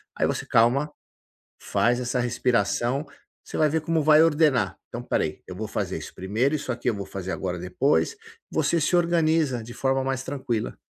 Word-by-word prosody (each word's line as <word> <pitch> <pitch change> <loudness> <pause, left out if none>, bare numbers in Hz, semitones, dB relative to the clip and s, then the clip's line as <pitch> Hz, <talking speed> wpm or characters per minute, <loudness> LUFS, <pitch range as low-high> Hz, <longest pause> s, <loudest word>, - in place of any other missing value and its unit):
aí - - +1
você, - - -2
calma, 130 +6 +3 0.7
faz 120 +1 +1
essa 125 0 -1
respiração, 120 +2 0 0.4
você - - -7
vai 155 -1 +4
ver 160 +1 0
como 165 0 0
vai 155 +1 +6
ordenar. 145 -11 +2
"Então, 120 - -6
espera 120 - 0
aí, 75 -1 -4
eu - - -8
vou 110 +3 -4
fazer - - -3
isso - - -9
primeiro, 110 +10 0
isso 140 -3 -3
aqui 125 +1 -1
eu 115 - -1
vou 100 - -5
fazer 95 -1 -6
agora 90 -2 -3
depois". 90 - +1 0.4
Você 160 +1 +1
se 175 - +2
organiza 160 -7 +2
de 120 +1 -9
forma 135 0 +1
mais 135 0 -2
tranquila. 130 -6 -3
125 Hz, 185 wpm, -25 LUFS, 110-150 Hz, 0.7 s, vai